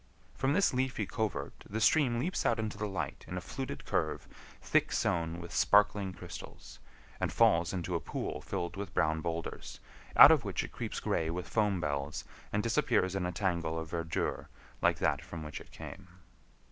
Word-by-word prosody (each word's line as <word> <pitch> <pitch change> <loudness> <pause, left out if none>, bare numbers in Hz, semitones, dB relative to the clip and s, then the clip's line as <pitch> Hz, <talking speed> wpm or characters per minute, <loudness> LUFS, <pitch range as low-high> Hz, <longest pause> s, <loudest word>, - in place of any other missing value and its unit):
From 135 +2 +1
this 200 -1 +3
leafy 125 -4 0
covert 110 +1 -3
the 110 - -2
stream 125 0 +4
leaps 170 +10 -1
out 115 - +2
into 110 -1 -2
the 105 0 -2
light 95 -1 -4
in 90 - -4
a - - 0
fluted 130 +8 -6
curve 75 -1 -1 0.3
thick - - +2
sown 85 0 0
with 85 0 -8
sparkling 105 -1 +4
crystals, 90 -2 -10 0.4
and - - 0
falls 85 0 +4
into 90 -1 -3
a 85 - +1
pool - - -4
filled 85 0 -3
with 100 -2 -6
brown 80 0 +2
boulders, 85 0 -4 0.4
out - - +11
of 155 -7 +4
which 100 -5 -2
it - - -8
creeps - - -4
gray 80 -1 0
with 90 +2 -4
foam 105 -4 +1
bells 70 -1 -2 0.3
and - - 0
disappears 95 0 +2
in 95 -2 -1
a - - -2
tangle 85 -4 -1
of 80 -1 -5
verdure 85 -1 -2 0.3
like - - +3
that - - +1
from 85 -2 -7
which 75 -2 -6
it - - -14
came. 95 -1 -9
90 Hz, 185 wpm, -32 LUFS, 85-105 Hz, 0.4 s, out